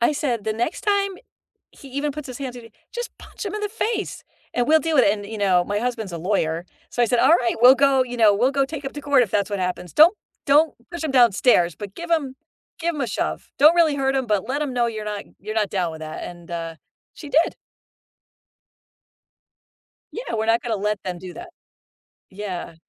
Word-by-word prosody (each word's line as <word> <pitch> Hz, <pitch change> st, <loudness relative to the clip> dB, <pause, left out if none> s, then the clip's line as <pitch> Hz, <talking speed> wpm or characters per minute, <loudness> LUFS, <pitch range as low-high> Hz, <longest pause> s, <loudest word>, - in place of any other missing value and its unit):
I 240 Hz, +6 st, +3 dB
said, 245 Hz, -8 st, -2 dB
"The 215 Hz, -, 0 dB
next 235 Hz, +7 st, -2 dB
time 400 Hz, -1 st, +1 dB, 0.6 s
he 275 Hz, -, -14 dB
even 280 Hz, +3 st, -2 dB
puts 300 Hz, 0 st, -7 dB
his 250 Hz, -, -7 dB
hands 260 Hz, -3 st, -5 dB
on 240 Hz, -, -10 dB
you, 230 Hz, -, -13 dB, 0.2 s
just 480 Hz, 0 st, -5 dB
punch -, -, -9 dB
him 400 Hz, -, -4 dB
in 425 Hz, -, -4 dB
the 415 Hz, -, -2 dB
face, 445 Hz, -2 st, -3 dB, 0.3 s
and 245 Hz, +1 st, 0 dB
we'll 315 Hz, +1 st, +6 dB
deal 325 Hz, -1 st, -1 dB
with 260 Hz, -, +6 dB
it," -, -, +5 dB
and, 205 Hz, -1 st, -4 dB
you 220 Hz, +1 st, -7 dB
know, 185 Hz, -3 st, +3 dB
my 205 Hz, +1 st, -1 dB
husband's 225 Hz, -6 st, -3 dB
a -, -, -3 dB
lawyer, 170 Hz, -2 st, -1 dB, 0.2 s
so 245 Hz, -, -1 dB
I -, -, +4 dB
said, 240 Hz, +1 st, +1 dB
"Alright, 235 Hz, -1 st, +4 dB
we'll 255 Hz, +2 st, +9 dB
go 270 Hz, -1 st, +4 dB
you 245 Hz, -1 st, -7 dB
know, 215 Hz, -3 st, +6 dB
we'll 245 Hz, +7 st, +2 dB
go 275 Hz, 0 st, +2 dB
take 290 Hz, -1 st, -7 dB
him 270 Hz, -, -5 dB
to 290 Hz, -, -7 dB
court, 285 Hz, -3 st, +4 dB
if 205 Hz, -, -6 dB
that's 200 Hz, 0 st, +1 dB
what 200 Hz, -2 st, -2 dB
happens. 180 Hz, -1 st, -3 dB
Don't 330 Hz, +7 st, +7 dB, 0.3 s
don't 295 Hz, +2 st, +4 dB, 0.2 s
push 340 Hz, -2 st, -5 dB
him 310 Hz, -, -1 dB
downstairs 235 Hz, -8 st, +4 dB
but 200 Hz, -2 st, -8 dB
give 340 Hz, 0 st, -7 dB
him 280 Hz, -6 st, 0 dB, 0.4 s
give 340 Hz, -1 st, -1 dB
him 285 Hz, -, -3 dB
a 245 Hz, -, -1 dB
shove. 75 Hz, -, -3 dB
Don't 305 Hz, +4 st, +7 dB
really 320 Hz, -4 st, +4 dB
hurt 270 Hz, 0 st, 0 dB
him, 265 Hz, -2 st, -1 dB
but 210 Hz, -3 st, 0 dB
let 280 Hz, +3 st, -1 dB
him 290 Hz, -3 st, -2 dB
know 240 Hz, -1 st, +2 dB
you're 215 Hz, -2 st, -5 dB
not 210 Hz, -1 st, -4 dB
you're 215 Hz, +2 st, -6 dB
not 210 Hz, -3 st, +1 dB
down 180 Hz, -4 st, -1 dB
with 160 Hz, -, -9 dB
that," 155 Hz, 0 st, -6 dB
and, 175 Hz, -1 st, -10 dB
uh, 165 Hz, -1 st, -4 dB, 0.4 s
she 300 Hz, -, -10 dB
did. 320 Hz, +4 st, +2 dB, 2.6 s
Yeah, -, -, -5 dB
we're 220 Hz, 0 st, -1 dB
not 230 Hz, +1 st, +3 dB
gonna 230 Hz, -3 st, -1 dB
let 210 Hz, 0 st, -2 dB
them 180 Hz, -2 st, -4 dB
do 180 Hz, 0 st, -9 dB
that. 350 Hz, 0 st, -9 dB, 0.8 s
Yeah. 190 Hz, -4 st, -6 dB
245 Hz, 230 wpm, -22 LUFS, 205-290 Hz, 2.6 s, we'll